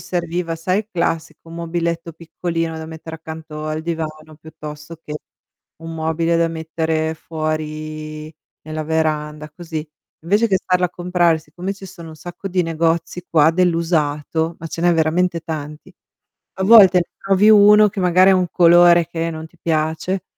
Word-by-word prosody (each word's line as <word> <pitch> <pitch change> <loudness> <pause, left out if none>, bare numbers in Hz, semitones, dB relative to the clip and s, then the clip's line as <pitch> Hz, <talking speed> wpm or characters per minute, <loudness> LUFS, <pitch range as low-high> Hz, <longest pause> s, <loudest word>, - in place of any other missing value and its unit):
serviva, 170 -1 -3
sai, 185 +4 0
il 215 0 -5
classico 165 -2 -3
mobiletto 170 0 -3
piccolino 165 0 -4
da 160 - -6
mettere 160 0 -9
accanto 160 -1 -8
al 155 0 -2
divano 155 -1 -5
piuttosto 155 0 -10
che 150 - -6 0.7
un 165 0 -7
mobile 165 +1 0
da 170 0 +2
mettere 160 0 -2
fuori 155 -1 -5 0.3
nella 155 0 -5
veranda, 155 -1 -2
così. 160 -1 -7 0.3
Invece 205 +7 +2
che 195 - +3
andarlo 180 -1 +1
a - - -14
comprare, 175 -2 +1
siccome 175 +5 -6
ci 195 -1 -11
sono 170 -2 -11
un 155 - -12
sacco 175 +4 -8
di 180 -1 +1
negozi 165 +2 -1
qua 160 -1 +5
dell'usato, 165 -2 0
ma 165 - -7
ce 165 +1 -5
n'è 175 - +4
veramente 170 +2 +1
tanti. 155 +2 -7 0.6
A 190 - -3
volte 190 -4 +8 0.2
trovi 195 +2 +3
uno 210 0 +7
che 195 - -6
magari 185 +1 +5
ha - - +5
un 180 -1 0
colore 175 0 +6
che 165 -1 -3
non 160 0 -7
ti 175 - -27
piace, 160 +4 -1
165 Hz, 155 wpm, -19 LUFS, 155-175 Hz, 0.7 s, volte